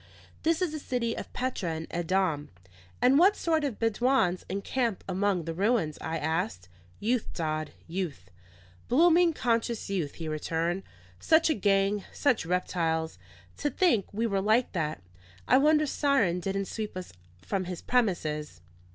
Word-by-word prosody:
"This 330 Hz, +3 st, +2 dB
is 350 Hz, -, 0 dB
the 310 Hz, -, -4 dB
city 240 Hz, -4 st, -1 dB
of -, -, -7 dB
Petra 220 Hz, -10 st, -2 dB
in 160 Hz, 0 st, -5 dB
Edom." 170 Hz, -3 st, 0 dB, 0.5 s
"And 260 Hz, +3 st, +6 dB
what 390 Hz, +4 st, +6 dB
sort 320 Hz, -2 st, 0 dB
of 275 Hz, -7 st, -2 dB
Bedouins 225 Hz, -5 st, +1 dB
encamp 210 Hz, +2 st, -1 dB
among 190 Hz, -2 st, 0 dB
the 165 Hz, -, -3 dB
ruins?" 195 Hz, -4 st, +1 dB
I 160 Hz, 0 st, -2 dB
asked. 160 Hz, -, -2 dB, 0.3 s
"Youth, 230 Hz, +2 st, 0 dB
Dodd, 155 Hz, -2 st, -2 dB, 0.2 s
youth; 160 Hz, -, -5 dB, 0.6 s
blooming, 335 Hz, +5 st, +5 dB
conscious 235 Hz, -6 st, -1 dB
youth," 170 Hz, -8 st, -2 dB
he 165 Hz, -, -6 dB
returned. 165 Hz, +4 st, -1 dB, 0.4 s
"Such 320 Hz, 0 st, +4 dB
a -, -, +4 dB
gang, 195 Hz, -1 st, +2 dB
such 255 Hz, -, +1 dB
reptiles! 165 Hz, -, -1 dB, 0.4 s
to 290 Hz, -, 0 dB
think 290 Hz, -, +2 dB
we 225 Hz, +3 st, -1 dB
were 200 Hz, -4 st, 0 dB
like 220 Hz, +5 st, +2 dB
that! 155 Hz, -, -3 dB, 0.4 s
I -, -, +6 dB
wonder 305 Hz, +1 st, +4 dB
Siron 270 Hz, -, +2 dB
didn't 195 Hz, +1 st, -2 dB
sweep 215 Hz, -1 st, -5 dB
us 185 Hz, -, -7 dB, 0.3 s
from 190 Hz, -, -2 dB
his 180 Hz, -1 st, -6 dB
premises." 160 Hz, -, 0 dB
195 Hz, 150 wpm, -28 LUFS, 165-250 Hz, 0.6 s, And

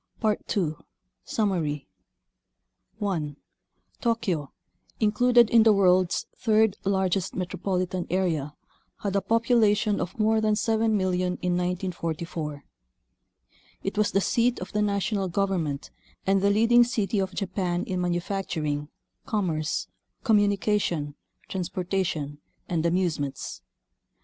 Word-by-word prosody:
II. 200 Hz, -6 st, 0 dB, 0.5 s
Summary 165 Hz, -10 st, -1 dB, 1.1 s
1. 165 Hz, -8 st, -2 dB, 0.7 s
Tokyo, 190 Hz, -, 0 dB, 0.5 s
included 240 Hz, +2 st, +5 dB
in 230 Hz, -, +7 dB
the 220 Hz, 0 st, +6 dB
world's 185 Hz, -3 st, +3 dB
third 220 Hz, -3 st, +3 dB
largest 190 Hz, -1 st, 0 dB
metropolitan 185 Hz, 0 st, -2 dB
area, 165 Hz, -6 st, 0 dB, 0.5 s
had 200 Hz, -1 st, -2 dB
a 200 Hz, -, +3 dB
population 220 Hz, -1 st, +2 dB
of 180 Hz, -, -5 dB
more 220 Hz, 0 st, +3 dB
than 215 Hz, -1 st, +2 dB
7,000,000 215 Hz, -5 st, +1 dB, 0.2 s
in 180 Hz, -1 st, +1 dB
1944. 170 Hz, -4 st, -3 dB, 1.2 s
It 195 Hz, -, -2 dB
was 210 Hz, 0 st, +2 dB
the 195 Hz, -, +2 dB
seat 240 Hz, +4 st, +2 dB
of 185 Hz, -, -7 dB
the 210 Hz, -, 0 dB
national 200 Hz, -1 st, 0 dB
government 175 Hz, -6 st, -1 dB, 0.3 s
and 195 Hz, 0 st, +3 dB
the 200 Hz, -, +3 dB
leading 230 Hz, +4 st, +5 dB
city 225 Hz, -4 st, 0 dB
of 190 Hz, -1 st, -2 dB
Japan 180 Hz, -2 st, -1 dB
in 185 Hz, -1 st, -2 dB
manufacturing, 175 Hz, -5 st, -2 dB, 0.4 s
commerce, 170 Hz, -9 st, -1 dB, 0.4 s
com 220 Hz, -5 st, +5 dB
munication, 200 Hz, -7 st, 0 dB, 0.3 s
transportation, 180 Hz, -5 st, -2 dB, 0.3 s
and 165 Hz, -2 st, 0 dB
amusements. 165 Hz, -6 st, -2 dB
190 Hz, 105 wpm, -26 LUFS, 175-210 Hz, 1.2 s, in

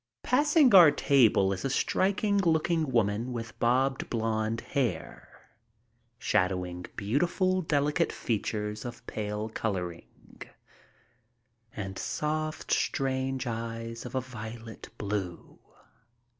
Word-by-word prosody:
Passing 290 Hz, -1 st, +4 dB
our 175 Hz, -5 st, +10 dB
table 120 Hz, -9 st, +4 dB
is 95 Hz, -, -5 dB
a 135 Hz, -, 0 dB
striking 200 Hz, +8 st, +1 dB
looking 165 Hz, -2 st, +2 dB
girl 105 Hz, -4 st, +2 dB
with 115 Hz, -1 st, -6 dB
bobbed 130 Hz, +3 st, +1 dB
blond 110 Hz, -1 st, -1 dB
hair, 130 Hz, -5 st, -4 dB, 0.7 s
shadowing 90 Hz, -3 st, -1 dB
beautiful, 175 Hz, -, +1 dB
delicate 150 Hz, +1 st, +1 dB
features 105 Hz, -1 st, -3 dB
of 120 Hz, -1 st, -8 dB
pale 105 Hz, 0 st, -3 dB
coloring 90 Hz, -6 st, -3 dB, 1.7 s
and 95 Hz, -2 st, -5 dB
soft, 155 Hz, +1 st, -3 dB
strange 130 Hz, -1 st, 0 dB
eyes 115 Hz, 0 st, -5 dB
of -, -, -8 dB
a 130 Hz, -, +1 dB
violet 115 Hz, -2 st, -9 dB
blue. 100 Hz, -4 st, -4 dB
120 Hz, 100 wpm, -29 LUFS, 105-150 Hz, 1.7 s, our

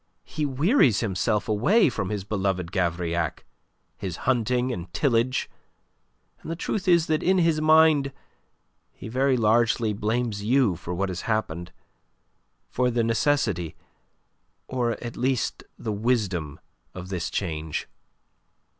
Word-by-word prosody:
He 150 Hz, -2 st, -2 dB
wearies 140 Hz, -, +3 dB
himself 105 Hz, 0 st, 0 dB
away 125 Hz, -, +3 dB
from 105 Hz, -7 st, -2 dB
his 105 Hz, -2 st, -3 dB
beloved 95 Hz, -3 st, -2 dB
Gavrillac, 85 Hz, -3 st, -1 dB, 0.5 s
his 90 Hz, -4 st, -4 dB
hunting 125 Hz, 0 st, +1 dB
and 85 Hz, -4 st, -7 dB
tillage, 125 Hz, -2 st, +1 dB, 0.9 s
and -, -, -9 dB
the 165 Hz, -, -2 dB
truth 185 Hz, +3 st, -3 dB
is 170 Hz, -2 st, +5 dB
that 155 Hz, -1 st, 0 dB
in 190 Hz, +1 st, +3 dB
his 165 Hz, -3 st, +2 dB
mind 155 Hz, -3 st, +5 dB, 0.8 s
he -, -, -10 dB
very 130 Hz, +3 st, +1 dB
largely 115 Hz, 0 st, +2 dB
blames 110 Hz, 0 st, -1 dB
you 120 Hz, -4 st, +3 dB
for 85 Hz, +1 st, -7 dB
what 95 Hz, +2 st, -1 dB
has 90 Hz, +5 st, -5 dB
happened 90 Hz, -5 st, -2 dB, 1.0 s
for 125 Hz, 0 st, 0 dB
the 120 Hz, -1 st, +1 dB
necessity, 115 Hz, -, 0 dB, 0.9 s
or 120 Hz, -2 st, 0 dB
at 120 Hz, 0 st, -6 dB
least, 130 Hz, -1 st, -1 dB
the 110 Hz, -, -3 dB
wisdom, 100 Hz, -, -1 dB, 0.4 s
of 95 Hz, 0 st, -7 dB
this 90 Hz, -3 st, -3 dB
change. 80 Hz, -4 st, -3 dB
115 Hz, 130 wpm, -25 LUFS, 95-130 Hz, 1.0 s, is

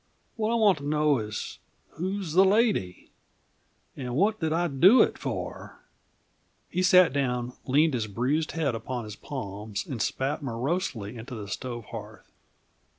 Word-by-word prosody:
What 220 Hz, 0 st, 0 dB
I -, -, +2 dB
want 205 Hz, -8 st, +4 dB
to -, -, -10 dB
know 150 Hz, -2 st, +2 dB
is 105 Hz, -1 st, -5 dB, 0.3 s
who's 185 Hz, 0 st, -3 dB
the 185 Hz, +3 st, +7 dB
lady? 195 Hz, -, +1 dB, 0.8 s
And 125 Hz, -2 st, -5 dB
what 210 Hz, +7 st, +2 dB
did 160 Hz, -2 st, -1 dB
I 170 Hz, +2 st, +1 dB
do 175 Hz, -, +6 dB
it -, -, -1 dB
for?" -, -, -5 dB, 0.9 s
He 180 Hz, -, 0 dB
sat 185 Hz, -5 st, +6 dB
down, 125 Hz, -3 st, -1 dB
leaned 150 Hz, +4 st, +3 dB
his 115 Hz, -4 st, -1 dB
bruised 130 Hz, +10 st, -1 dB
head 155 Hz, -6 st, 0 dB
upon 120 Hz, +2 st, -4 dB
his 105 Hz, -1 st, -8 dB
palms, 105 Hz, -6 st, -5 dB
and 120 Hz, -5 st, -4 dB
spat 140 Hz, +4 st, -1 dB
morosely 125 Hz, -, -2 dB
into 120 Hz, +2 st, -8 dB
the 105 Hz, -2 st, -7 dB
stove 120 Hz, +2 st, -5 dB
hearth. 110 Hz, -1 st, -9 dB
140 Hz, 150 wpm, -27 LUFS, 115-175 Hz, 0.9 s, the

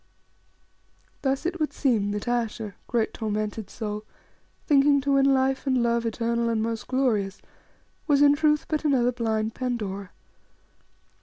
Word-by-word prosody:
Thus 270 Hz, +2 st, -1 dB
it 350 Hz, 0 st, -2 dB
would 305 Hz, -, 0 dB
seem 225 Hz, -8 st, +1 dB
that 205 Hz, +3 st, -4 dB
Ayesha, 225 Hz, -3 st, -2 dB
great 230 Hz, -3 st, 0 dB
tormented 215 Hz, -1 st, -3 dB
soul, 210 Hz, -2 st, -5 dB, 0.6 s
thinking 280 Hz, -1 st, +4 dB
to 280 Hz, +1 st, -1 dB
win 275 Hz, 0 st, +4 dB
life 265 Hz, +1 st, +1 dB
and 260 Hz, -2 st, +2 dB
love 235 Hz, 0 st, +1 dB
eternal 235 Hz, +1 st, -1 dB
and 225 Hz, -1 st, 0 dB
most 225 Hz, 0 st, -3 dB
glorious, 220 Hz, -8 st, 0 dB, 0.7 s
was 290 Hz, -2 st, +4 dB
in 285 Hz, 0 st, +7 dB
truth 300 Hz, 0 st, +2 dB
but 310 Hz, -1 st, -1 dB
another 255 Hz, -5 st, +3 dB
blind 220 Hz, -2 st, -1 dB
Pandora. 205 Hz, -7 st, -3 dB
235 Hz, 140 wpm, -26 LUFS, 220-275 Hz, 0.7 s, in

